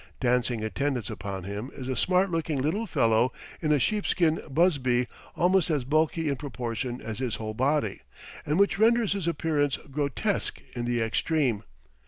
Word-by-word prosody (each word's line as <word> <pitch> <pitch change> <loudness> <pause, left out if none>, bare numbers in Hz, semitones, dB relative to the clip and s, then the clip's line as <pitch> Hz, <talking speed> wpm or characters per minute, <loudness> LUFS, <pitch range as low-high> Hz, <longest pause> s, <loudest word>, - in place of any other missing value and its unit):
Dancing 125 -2 +1
attendance 125 0 -1
upon 100 -3 -5
him 100 +6 -5
is 130 - -6
a 130 - -1
smart 185 +7 +2
looking 160 -3 -1
little 170 +12 0
fellow 115 - +3 0.3
in 155 -3 +1
a 150 - +5
sheepskin 170 - +1
busby 135 -6 +2 0.3
almost 180 0 +3
as 150 -5 +1
bulky 155 +4 +1
in 140 -2 0
proportion 120 -2 -4
as 110 0 -5
his 125 -4 -1
whole 110 -1 -4
body, 140 +6 0 0.4
and 150 +2 0
which 200 0 +3
renders 225 -2 +4
his 195 -4 -3
appearance 150 -3 +1
grotesque 140 -1 -1
in 120 -1 -3
the 120 -1 0
extreme. 120 0 +1
140 Hz, 160 wpm, -27 LUFS, 120-165 Hz, 0.4 s, a